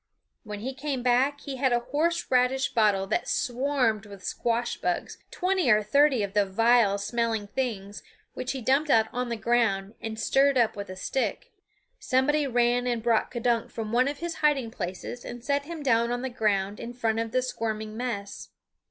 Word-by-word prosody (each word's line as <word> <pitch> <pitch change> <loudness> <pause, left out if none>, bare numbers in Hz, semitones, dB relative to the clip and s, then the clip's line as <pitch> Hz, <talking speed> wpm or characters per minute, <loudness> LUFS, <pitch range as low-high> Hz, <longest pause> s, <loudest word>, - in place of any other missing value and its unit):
When 210 -2 -7
he 260 +4 -4
came 270 -2 -3
back 260 +4 +2
he 275 -2 -6
had 260 0 +2
a 240 0 +2
horse 305 +7 0
radish 255 +1 +2
bottle 210 -5 +3
that 205 - -1
swarmed 250 -5 0
with 200 -2 -12
squash 235 +3 -1
bugs, 180 -1 -3
twenty 370 -6 0
or 215 -1 +5
thirty 270 +1 +3
of 200 -1 -4
the 205 0 +4
vile 220 +1 +3
smelling 225 +1 -1
things, 205 -3 -4 0.3
which 255 - -3
he 265 - -5
dumped 280 +5 +2
out 220 -4 +4
on 250 -1 -2
the 235 - -1
ground 220 -3 +1
and 220 -1 -5
stirred 275 +3 +3
up 235 -3 +2
with 200 -1 -6
a 185 - -6
stick. 265 - -2 0.5
Somebody 285 +3 +1
ran 245 0 +2
and 235 -2 -1
brought 230 -2 +2
K'dunk 240 -2 0
from 220 -2 -5
one 250 +3 +3
of 285 0 -3
his 340 +1 -5
hiding 280 -6 +2
places 190 +4 -6
and 240 -1 -8
set 280 +2 0
him 325 -1 -7
down 235 -3 +2
on 245 +1 -2
the 260 - -2
ground 205 -3 0
in 240 +1 -7
front 225 -2 0
of 225 -1 -2
the 255 +2 +1
squirming 220 -3 -4
mess. 225 -4 -5
240 Hz, 190 wpm, -27 LUFS, 215-265 Hz, 0.5 s, or